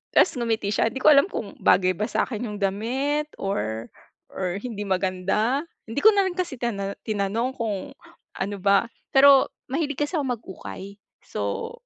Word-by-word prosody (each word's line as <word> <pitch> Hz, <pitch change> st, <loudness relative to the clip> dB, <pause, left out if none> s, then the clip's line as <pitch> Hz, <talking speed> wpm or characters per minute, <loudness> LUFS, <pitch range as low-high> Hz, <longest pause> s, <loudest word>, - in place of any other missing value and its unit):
tapos -, -, +6 dB
ngumiti 225 Hz, -3 st, 0 dB
siya 225 Hz, -, +2 dB
hindi 265 Hz, -, -6 dB
ko -, -, +8 dB
alam 280 Hz, +4 st, +5 dB
kung 205 Hz, -, -6 dB
bagay 185 Hz, 0 st, +4 dB
ba 210 Hz, -, 0 dB
sa'kin 235 Hz, -1 st, -1 dB
yung 210 Hz, -, -5 dB
damit 260 Hz, +10 st, 0 dB
or 110 Hz, -, -2 dB, 0.4 s
or 185 Hz, -1 st, -2 dB
hindi 225 Hz, -5 st, -4 dB
maganda 195 Hz, +8 st, 0 dB, 0.2 s
hindi 225 Hz, +5 st, -2 dB
ko -, -, +8 dB
na 400 Hz, -, +4 dB
rin 355 Hz, -, -4 dB
kasi 355 Hz, -6 st, -2 dB
tina 200 Hz, -5 st, -2 dB
tinanong 215 Hz, +3 st, -1 dB
kung 215 Hz, -5 st, -3 dB, 0.5 s
ano 200 Hz, +1 st, -2 dB
ba 200 Hz, +3 st, +4 dB, 0.3 s
pero 275 Hz, 0 st, +7 dB, 0.2 s
mahilig 290 Hz, -1 st, -1 dB
kasi 350 Hz, -, -5 dB
ako 290 Hz, -, 0 dB
mag-ukay. 195 Hz, 0 st, -9 dB, 0.3 s
So, 460 Hz, 0 st, -3 dB
220 Hz, 160 wpm, -24 LUFS, 195-270 Hz, 0.5 s, ko